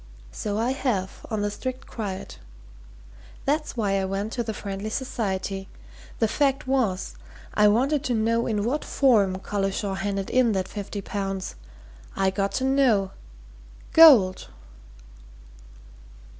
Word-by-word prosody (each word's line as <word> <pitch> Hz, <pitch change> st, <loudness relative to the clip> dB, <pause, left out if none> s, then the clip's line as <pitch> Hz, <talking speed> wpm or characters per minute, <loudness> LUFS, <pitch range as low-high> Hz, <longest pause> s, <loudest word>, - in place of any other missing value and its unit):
So 205 Hz, -, -3 dB
I 235 Hz, +3 st, +1 dB
have 220 Hz, -9 st, -2 dB
on 215 Hz, -2 st, -1 dB
the 205 Hz, -, -1 dB
strict 255 Hz, +4 st, -5 dB
quiet. 200 Hz, -5 st, -6 dB, 1.1 s
That's 300 Hz, -1 st, -1 dB
why 200 Hz, -3 st, +1 dB
I -, -, -1 dB
went 195 Hz, +3 st, -3 dB
to 245 Hz, -, -1 dB
the 225 Hz, -1 st, -3 dB
Friendly 200 Hz, 0 st, -5 dB
Society. 195 Hz, -6 st, -3 dB, 0.5 s
The 225 Hz, -, +2 dB
fact 275 Hz, +4 st, +1 dB
was 245 Hz, -9 st, 0 dB, 0.4 s
I 210 Hz, 0 st, +5 dB
wanted 265 Hz, +7 st, +2 dB
to 245 Hz, -, 0 dB
know 230 Hz, +1 st, +1 dB
in 210 Hz, -3 st, 0 dB
what 265 Hz, +7 st, -1 dB
form 210 Hz, -9 st, +3 dB
Collishaw 195 Hz, +1 st, -2 dB
handed 195 Hz, 0 st, -3 dB
in 250 Hz, -3 st, +3 dB
that 190 Hz, -1 st, -1 dB
fifty 205 Hz, 0 st, -6 dB
pounds. 195 Hz, -1 st, -4 dB, 0.6 s
I 195 Hz, -1 st, +2 dB
got 195 Hz, +1 st, -1 dB
to 260 Hz, -, -1 dB
know. 255 Hz, -8 st, +3 dB, 0.8 s
Gold!" 245 Hz, -, +7 dB
210 Hz, 130 wpm, -25 LUFS, 195-255 Hz, 1.1 s, Gold